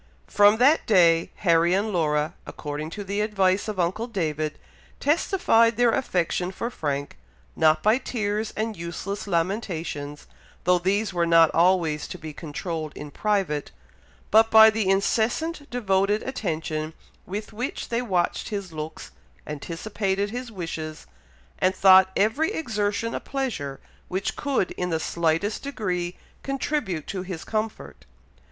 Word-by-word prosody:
From 205 - +5
that 275 +7 +4
day, 170 -6 +4 0.2
Harry 170 +1 +4
and 205 +2 -1
Laura, 150 -3 +1
according 150 +1 -5
to 205 +4 -6
the 200 +1 -2
advice 195 -2 +1
of 210 -3 -4
uncle 190 +7 0
David, 155 -8 -2 0.4
testified 280 - +3
their 240 -1 +4
affection 180 -6 0
for 235 +5 -4
Frank, 145 - -3 0.4
not 155 0 +3
by 220 +4 +4
tears 215 -3 -2
and 220 0 -2
useless 195 +5 -5
lamentations, 165 -5 -2 0.4
though 180 0 +3
these 200 +3 0
were 170 -1 +1
not 165 -1 +6
always 170 -3 +2
to - - -7
be 155 -1 -8
controlled 155 0 -5
in 150 0 -8
private, 190 -7 -1 0.6
but 225 +1 +6
by 220 0 +8
the 215 -3 0
incessant, 240 +10 0
devoted 205 -3 +1
attention 160 -9 -3 0.3
with 210 +4 -5
which 245 +5 -4
they 235 +1 0
watched 185 -8 -1
his 200 -5 -5
looks, 155 0 -7 0.3
anticipated 190 +6 -3
his 245 0 -5
wishes, 160 -5 -6 0.5
and 185 +1 +2
thought 190 -1 +7
every 250 - +2
exertion 225 - -2
a - - -2
pleasure 235 - -4 0.3
which 185 +2 -2
could 275 -10 -1
in 180 - -3
the 160 -2 0
slightest 170 +6 0
degree 180 -10 -3 0.2
contribute 275 - -2
to 190 -2 -4
his 180 -3 -6
comfort. 220 0 -4
190 Hz, 135 wpm, -25 LUFS, 165-220 Hz, 0.6 s, by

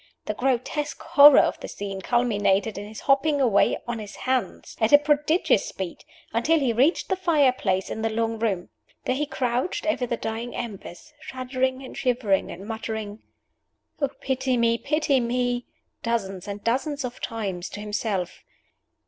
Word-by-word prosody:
The 215 - -2
grotesque 265 +5 -1
horror 285 -1 +8
of - - -1
the - - -7
scene 195 -1 -6
culminated 210 -3 +1
in 205 +1 -6
his 215 0 -9
hopping 285 +2 +3
away 230 -7 +3
on 240 -1 -3
his 210 -1 -8
hands, 260 -1 -2
at 220 - +3
a 290 - +10
prodigious 295 +3 +2
speed, 190 -3 -6 0.3
until 275 +9 +3
he 265 -6 +1
reached 270 +9 +2
the 380 - +2
fire 320 -8 +3
place 190 -6 -1
in 220 - -4
the 225 - +1
long 225 0 -1
room. 200 -6 -1 0.4
There - - +1
he 290 +3 -1
crouched 250 +5 -1
over 290 -6 0
the 235 - -2
dying 225 +2 -4
embers, 225 - -7
shuddering 260 -1 -2
and 260 - -9
shivering, 245 -7 +1
and 195 +4 -8
muttering, 220 -1 -5 0.8
"Oh, 285 - +2
pity 260 -1 0
me, 235 0 +2
pity 300 -2 +1
me!" 245 0 -1 0.3
dozens 195 -6 -2
and 205 0 -6
dozens 275 +4 -1
of 245 0 -7
times 195 -6 -4
to - - -8
himself. 210 -3 -3
240 Hz, 165 wpm, -25 LUFS, 215-270 Hz, 0.8 s, a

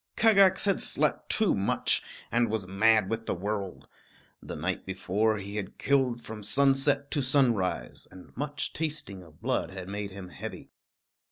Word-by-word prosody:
Kagax 200 -4 +5
had 200 - +2
slept - - +1
too 220 -3 +3
much, 100 0 +2 0.3
and 115 -1 +2
was 110 -3 -2
mad 105 +2 +3
with 115 +2 -3
the - - 0
world. 100 +1 -4 0.5
The - - -7
night - - -2
before, 110 +3 0
he 100 +1 -6
had 100 -3 -5
killed 130 -3 +1
from 110 -2 -8
sunset 140 +4 +2
to 145 - +2
sunrise, 125 -8 0
and 95 - -15
much 145 +1 -3
tasting 150 -12 -4
of 80 -3 -18
blood - - 0
had 95 0 -8
made 100 +1 -4
him 95 -1 -9
heavy. 75 - -8
110 Hz, 160 wpm, -28 LUFS, 95-140 Hz, 0.5 s, Kagax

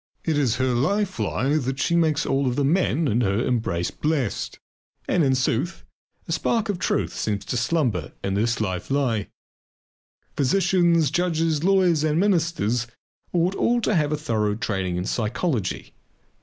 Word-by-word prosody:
It 160 - 0
is 135 -6 +2
her 130 0 0
life 195 - 0
lie 140 +4 0
that 135 -2 -2
she 170 - +1
makes 160 -3 +2
all 135 -1 +1
the 135 +3 0
men 165 0 +2
in 120 0 +1
her 105 +2 +1
embrace 95 -8 -1
blessed. 150 -8 -2 0.5
And 175 - +2
in 135 -2 +3
sooth, 130 +6 -1 0.4
a - - -5
spark 225 -2 0
of 195 -4 -1
truth - - 0
seems 105 -2 -2
to - - -3
slumber 120 - 0
in 95 - -1
this 115 +4 0
life 95 -4 -3
lie. 130 -7 0 1.1
Physicians, 170 0 +2
judges, 165 -3 0
lawyers, 180 -5 +3
and 155 +1 +1
ministers 165 - +1 0.4
ought 175 +2 +1
all 240 +4 +1
to 215 - +1
have 155 -5 +1
a 150 - 0
thorough 110 -8 -1
training 95 -5 -2
in 90 - -2
psychology. 115 - -2
140 Hz, 155 wpm, -24 LUFS, 115-170 Hz, 1.1 s, in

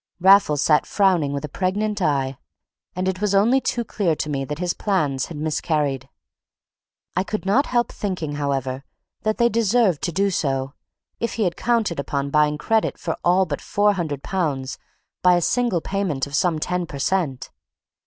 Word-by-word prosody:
Raffles 185 -6 +5
sat 150 -2 +3
frowning 180 -8 +2
with 140 +1 -3
a - - -5
pregnant 205 +6 -1
eye, 135 -5 0 0.6
and 185 +1 -1
it 190 +1 -2
was 205 -1 +1
only 235 +7 +4
too 240 - -1
clear 180 -8 0
to 150 - -3
me 135 -1 -1
that 150 +2 -5
his 180 +1 -1
plans 150 -10 0
had 165 - -8
miscarried. 150 -3 -1 1.1
I 185 - +2
could 215 0 -4
not 245 +9 +3
help 240 -1 +1
thinking, 180 -7 -3
however, 135 -2 -2 0.4
that 215 0 0
they 235 - +4
deserved 225 -6 +2
to 170 - -1
do 195 +3 +1
so, 135 -5 -1 0.5
if 235 - -2
he 225 - 0
had 175 -3 0
counted 225 -9 0
upon 140 0 -2
buying 150 0 +3
credit 220 +7 0
for 165 -4 -3
all 180 +2 +4
but - - -4
£400 160 -7 -1 0.4
by 180 -1 +5
a - - +3
single 235 -1 +1
payment 185 -9 -1
of 140 - -12
some 170 +2 +2
ten 180 +2 -2
per 140 - -7
cent. 135 -6 -1
175 Hz, 175 wpm, -22 LUFS, 145-200 Hz, 1.1 s, Raffles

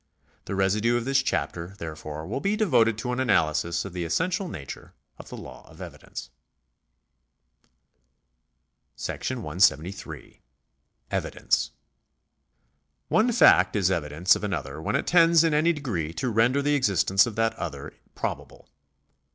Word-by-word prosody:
The 100 - -4
residue 105 +5 +2
of 120 - -3
this 135 +1 +2
chapter, 90 -8 -3
therefore, 80 -2 -7
will 105 +9 -3
be 200 +7 0
devoted 125 - +2
to 125 +2 -3
an 125 - -2
analysis 85 -8 +1
of 100 - -8
the 90 -1 -3
essential 180 - -1
nature 70 - -9 0.2
of - - -11
the - - -8
law - - -11
of - - -16
evidence. - - -9 2.7
§ - - -4
173. 90 +7 -1 0.7
Evidence. - - -1 1.4
One 225 +3 +3
fact 235 - +5
is 95 -3 +2
evidence 80 +2 +2
of - - -6
another 75 -7 -4
when - - -2
it - - 0
tends 170 -1 +5
in 165 -2 +2
any 155 +3 +3
degree 105 - -3
to 120 +9 -2
render 120 +6 +2
the 145 +1 +2
existence 100 -6 +3
of 115 - -6
that 115 0 +1
other 70 -3 -6 0.2
probable. - - -5
105 Hz, 135 wpm, -26 LUFS, 85-140 Hz, 2.7 s, fact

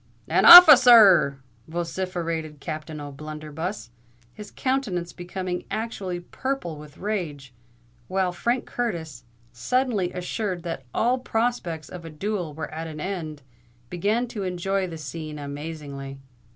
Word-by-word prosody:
"An - - +2
officer 300 -8 +11
r 225 -2 +10
r!" 140 0 -3 0.3
vociferated 165 -2 -4
Captain 155 0 -6
O'Blunderbuss, 155 - -7 0.4
his 210 -1 -10
countenance 215 -11 -2
becoming 180 0 -5
actually 195 -5 -4
purple 260 - -4
with 150 -1 -13
rage, 160 -11 -4 0.5
while 190 -1 0
Frank 240 +8 -1
Curtis, 165 - -4 0.3
suddenly 210 - -1
assured 180 0 -4
that 165 -6 -5
all 245 +3 +1
prospects 225 - -2
of 180 -2 -9
a 165 - -8
duel 175 -1 -4
were 160 -1 -6
at 165 +1 -6
an 155 -1 -8
end, 155 -5 -5 0.5
began 210 +7 0
to 215 -4 -6
enjoy 190 +1 -2
the 165 -2 -7
scene 155 0 -7
amazingly. 145 -1 -7
175 Hz, 125 wpm, -24 LUFS, 155-205 Hz, 0.5 s, officer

